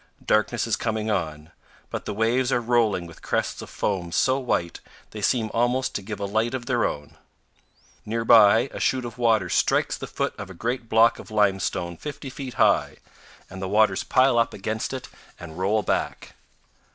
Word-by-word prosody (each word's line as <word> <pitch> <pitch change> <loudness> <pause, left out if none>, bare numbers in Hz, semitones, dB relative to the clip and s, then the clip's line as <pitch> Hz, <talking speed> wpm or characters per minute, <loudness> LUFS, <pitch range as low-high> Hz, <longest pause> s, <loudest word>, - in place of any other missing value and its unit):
Darkness 110 +2 +1
is 115 -2 +1
coming 110 -1 -2
on; 80 -5 -3 0.4
but - - -5
the - - -3
waves 120 +4 +1
are 120 - +2
rolling 115 -6 +1
with 85 -1 -13
crests - - -2
of - - -9
foam 90 -4 -2
so 130 +9 +2
white 90 -10 -2 0.3
they 105 - -7
seem 110 0 +1
almost 120 +3 +1
to - - -3
give 105 +1 -6
a 100 - -2
light 110 +5 0
of 120 -2 -5
their 120 -3 +1
own. 75 0 -5 0.8
Near 115 +1 -3
by, 110 -1 +7
a - - -6
chute 130 -2 0
of 120 0 -8
water 110 -6 +3
strikes - - +1
the - - -7
foot - - -2
of - - -7
a 95 - -10
great 120 +4 -3
block 115 +1 +4
of - - -11
limestone 95 -4 0
50 140 - -7
feet 130 -2 -7
high, - - +2 0.5
and 95 0 -9
the 95 - -3
waters 105 +2 +3
pile 130 -2 +3
up 115 - 0
against 110 +3 -3
it 130 -1 -6 0.3
and 85 0 -9
roll 105 +3 +1
back. - - -2
110 Hz, 190 wpm, -24 LUFS, 95-120 Hz, 0.8 s, by